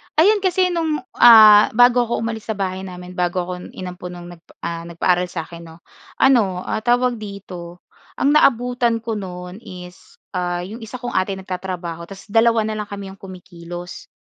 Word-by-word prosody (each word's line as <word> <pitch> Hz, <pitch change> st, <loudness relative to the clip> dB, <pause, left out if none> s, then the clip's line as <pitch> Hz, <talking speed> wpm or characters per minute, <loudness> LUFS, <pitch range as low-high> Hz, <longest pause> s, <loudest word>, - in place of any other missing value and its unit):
Ayun, 410 Hz, +7 st, +5 dB
kasi 370 Hz, -1 st, +1 dB
no'ng, 320 Hz, -5 st, -1 dB, 0.2 s
ah, 215 Hz, -3 st, +9 dB
bago 245 Hz, 0 st, +5 dB
'ko 235 Hz, -, -2 dB
umalis 225 Hz, -1 st, -5 dB
sa 220 Hz, -, -2 dB
bahay 190 Hz, -1 st, -3 dB
namin, 180 Hz, -1 st, -9 dB
bago 180 Hz, 0 st, 0 dB
ako 180 Hz, 0 st, -7 dB
inampon 180 Hz, -1 st, -7 dB
no'ng 175 Hz, 0 st, -10 dB
nagpa 165 Hz, -, -24 dB
ah, 170 Hz, 0 st, -4 dB
nagpaaral 180 Hz, +1 st, +1 dB
sa'kin 170 Hz, 0 st, -7 dB
'no, 165 Hz, +1 st, -15 dB, 0.3 s
ano, 205 Hz, -9 st, +3 dB
ah, -, -, -2 dB
tawag 245 Hz, 0 st, +1 dB
dito, 180 Hz, -4 st, -9 dB, 0.3 s
ang 280 Hz, -, +2 dB
naabutan 245 Hz, -4 st, +2 dB
ko 225 Hz, -2 st, -3 dB
no'n 180 Hz, +1 st, -8 dB
is, 180 Hz, -5 st, -12 dB, 0.2 s
ah, 175 Hz, -1 st, -2 dB
'yong 215 Hz, +6 st, -8 dB
isa 225 Hz, +2 st, -9 dB
kong 245 Hz, -, -4 dB
ate 190 Hz, +1 st, 0 dB
nagtatrabaho 180 Hz, -3 st, -6 dB
tas 195 Hz, -1 st, -11 dB
2 225 Hz, 0 st, +4 dB
na 215 Hz, 0 st, -3 dB
lang 210 Hz, -, -4 dB
kami 200 Hz, -1 st, -7 dB
'yong 195 Hz, -, -15 dB
kumikilos, 175 Hz, -2 st, -10 dB
195 Hz, 175 wpm, -20 LUFS, 180-230 Hz, 0.3 s, ah